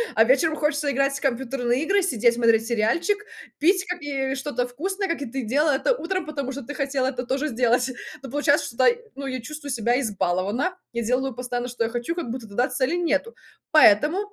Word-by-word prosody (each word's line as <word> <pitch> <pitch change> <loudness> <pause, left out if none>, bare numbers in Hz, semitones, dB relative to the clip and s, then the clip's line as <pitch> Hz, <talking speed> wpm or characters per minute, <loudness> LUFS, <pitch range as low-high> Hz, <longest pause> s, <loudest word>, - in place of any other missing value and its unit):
а 225 - +6
вечером 275 +7 +3
хочется 295 -1 0
играть 275 +1 +1
в - - -11
компьютерные 255 -1 0
игры, 390 +3 +2
сидеть 235 - +2
смотреть 230 -1 +3
сериальчик, 240 - +1 0.4
пить 370 +4 +3
капи 285 -6 -2
что-то 265 -2 -2
вкусное, 385 +10 -3
как 335 -4 -2
и - - -4
ты 265 +2 -4
делала 290 +7 +2
это - - +1
утром, 370 -3 -3
потому 280 -3 -4
что 280 - -6
ты 290 +5 -7
хотела 270 -2 0
это 255 -1 -3
тоже 270 +4 -1
сделать. 245 -1 +2 0.3
Ну 265 - -8
получается, 290 +1 +2
что, 245 +2 +1 0.3
ну, 275 - -6
я 260 -1 -3
чувствую 295 +2 -7
себя 240 +1 +1
избалованно, 210 - -1 0.2
я 235 0 -2
делаю 255 +3 0
постоянно 245 0 -4
что 240 -1 -2
я 225 - -1
хочу, 240 +6 -3
как 330 -9 -4
будто 235 -2 -5
тогда 240 +5 0
цели 260 +5 0
нету. 345 +5 0 0.4
Поэтому, 305 - +6
265 Hz, 195 wpm, -24 LUFS, 240-300 Hz, 0.4 s, а